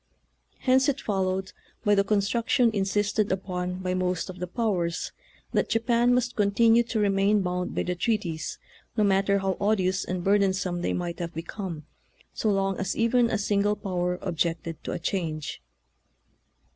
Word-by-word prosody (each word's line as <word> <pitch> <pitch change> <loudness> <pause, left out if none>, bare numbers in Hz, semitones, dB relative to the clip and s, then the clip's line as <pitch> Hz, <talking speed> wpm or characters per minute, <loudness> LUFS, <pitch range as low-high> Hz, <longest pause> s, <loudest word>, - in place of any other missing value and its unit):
Hence 260 +2 +4
it 275 -1 -1
followed, 190 -2 -1 0.3
by 205 - +5
the 200 -1 +4
construction 225 +4 +2
insisted 205 +1 +1
upon 180 -1 -3
by 180 0 0
most 185 0 -1
of 185 - -13
the 180 - -3
powers, 180 -5 -1 0.4
that - - +1
Japan 235 +1 +2
must 250 -1 0
continue 225 +3 +4
to 230 - -3
remain 200 0 +3
bound 180 0 -2
by - - 0
the 180 - -1
treaties, 175 -6 -2 0.4
no 215 - +4
matter 200 0 +3
how 195 -2 -1
odious 190 -2 +1
and 180 -1 -3
burdensome 190 -3 +1
they - - 0
might 175 -1 -3
have 170 -1 -5
become, 165 -2 -5 0.5
so 220 - 0
long 195 -1 +1
as 190 -1 -2
even 235 +1 +3
a 220 - +1
single 205 0 +1
power 180 -3 -2
objected 165 -1 -2
to - - -3
a - - -2
change. 160 - -3
195 Hz, 160 wpm, -27 LUFS, 180-210 Hz, 0.5 s, by